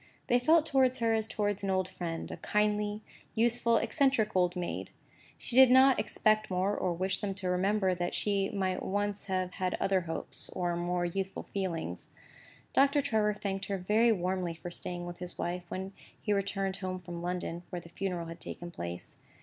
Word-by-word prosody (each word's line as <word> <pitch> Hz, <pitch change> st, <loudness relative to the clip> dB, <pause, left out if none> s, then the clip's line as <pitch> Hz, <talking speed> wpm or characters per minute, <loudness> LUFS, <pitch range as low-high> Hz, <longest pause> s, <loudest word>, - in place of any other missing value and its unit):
They 245 Hz, -, +3 dB
felt 315 Hz, +5 st, +5 dB
towards 265 Hz, -4 st, +3 dB
her 230 Hz, -2 st, +2 dB
as 220 Hz, -1 st, 0 dB
towards 205 Hz, -2 st, -1 dB
an 195 Hz, -, -2 dB
old 185 Hz, -1 st, +1 dB
friend, 165 Hz, -3 st, -5 dB
a -, -, -5 dB
kindly, 210 Hz, 0 st, 0 dB, 0.3 s
useful, 235 Hz, 0 st, +3 dB
eccentric 235 Hz, -3 st, +2 dB
old 180 Hz, -1 st, +3 dB
maid. 180 Hz, -1 st, -3 dB, 0.5 s
She 240 Hz, -, -5 dB
did 260 Hz, -1 st, +9 dB
not 260 Hz, +1 st, +6 dB
expect 215 Hz, 0 st, +2 dB
more, 190 Hz, +2 st, +1 dB
or 180 Hz, -, 0 dB
wish 185 Hz, +3 st, -1 dB
them 195 Hz, -2 st, -2 dB
to 185 Hz, -2 st, -2 dB
remember 190 Hz, +1 st, +2 dB
that 175 Hz, 0 st, -2 dB
she 200 Hz, -2 st, +1 dB
might 190 Hz, -4 st, -1 dB
once 205 Hz, +1 st, -2 dB
have 185 Hz, -2 st, -1 dB
had 185 Hz, 0 st, -1 dB
other 195 Hz, -1 st, +1 dB
hopes, 165 Hz, -1 st, -3 dB
and 175 Hz, -1 st, -1 dB
more 175 Hz, 0 st, 0 dB
youthful 190 Hz, +2 st, -3 dB
feelings. 170 Hz, -, -4 dB, 0.6 s
Doctor 280 Hz, +2 st, +4 dB
Trevor 220 Hz, -6 st, +1 dB
thanked 195 Hz, -2 st, -3 dB
her 200 Hz, -, -2 dB
very 215 Hz, +5 st, +3 dB
warmly 180 Hz, -3 st, -1 dB
for 175 Hz, +2 st, -7 dB
staying 175 Hz, 0 st, -2 dB
with 175 Hz, 0 st, -7 dB
his 180 Hz, 0 st, -6 dB
wife, 175 Hz, 0 st, -3 dB
when 190 Hz, +1 st, -5 dB, 0.3 s
he 210 Hz, -, 0 dB
returned 195 Hz, -1 st, -1 dB
home 185 Hz, -1 st, -3 dB
from 175 Hz, -1 st, -7 dB
London 175 Hz, -1 st, -3 dB
(where 180 Hz, -, -4 dB
the 170 Hz, -, -14 dB
funeral 180 Hz, -1 st, -3 dB
had 165 Hz, 0 st, -8 dB
taken 175 Hz, 0 st, -7 dB
place). 85 Hz, -, -6 dB
190 Hz, 185 wpm, -31 LUFS, 180-210 Hz, 0.6 s, did